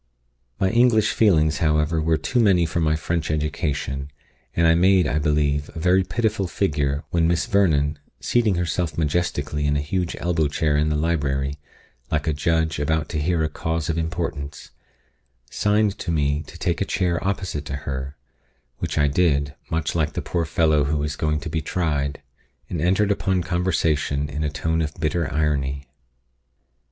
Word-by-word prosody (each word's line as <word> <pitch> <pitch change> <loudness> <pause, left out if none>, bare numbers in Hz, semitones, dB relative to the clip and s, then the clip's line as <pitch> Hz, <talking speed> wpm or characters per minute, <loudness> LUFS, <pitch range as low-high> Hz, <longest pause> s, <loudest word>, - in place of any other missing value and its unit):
_ - - -47 0.6
My 95 - +2
English 115 -2 +4
feelings, 80 -8 +3
however, 75 0 +2
were 80 0 +2
too 80 - -1
many 95 -6 +4
for 80 +1 -2
my 80 -1 +2
French 80 +2 -2
education, 75 -3 -2 0.5
and 85 - +3
I 80 - +6
made, 90 +2 +4
I 75 - 0
believe, 75 -1 +1
a - - -5
very 90 +3 +3
pitiful 110 -1 -1
figure, 75 -6 -1
when 85 -1 +2
Miss 85 0 +1
Vernon, 75 -7 +2 0.2
seating 115 -5 +2
herself 85 -2 -1
majestically 75 -2 -1
in 75 0 +2
a - - 0
huge 85 +4 -2
elbow 85 -3 +1
chair 75 +1 0
in 75 +1 +2
the 75 - 0
library, 70 -3 -1 0.5
like 75 -1 0
a 80 - +1
judge 80 +1 0
about 80 +1 0
to 80 - -2
hear 85 +1 +1
a - - +1
cause 80 +1 -3
of 85 - -3
importance, 80 -3 -4 0.8
signed 105 -1 +1
to - - -5
me 75 -2 +1
to 85 - -11
take 85 0 -1
a - - +2
chair 90 -3 0
opposite 95 -7 -2
to 70 - -4
her 70 +1 -4 0.6
(which - - -3
I 75 -1 +4
did, 70 -2 +1 0.2
much 80 -2 -1
like 80 -3 0
the - - -3
poor 85 -2 -1
fellow 80 -2 +2
who 75 +1 0
is 75 0 -2
going 75 0 0
to 85 - -5
be 80 - -1
tried), 75 -3 -2 0.5
and 85 - -2
entered 95 +4 +2
upon 95 -2 0
conversation 80 -5 0
in 75 +2 -3
a 75 - 0
tone 80 +2 -1
of 80 -1 -3
bitter 85 0 -1
irony. 70 -3 -1
80 Hz, 175 wpm, -23 LUFS, 75-85 Hz, 0.8 s, I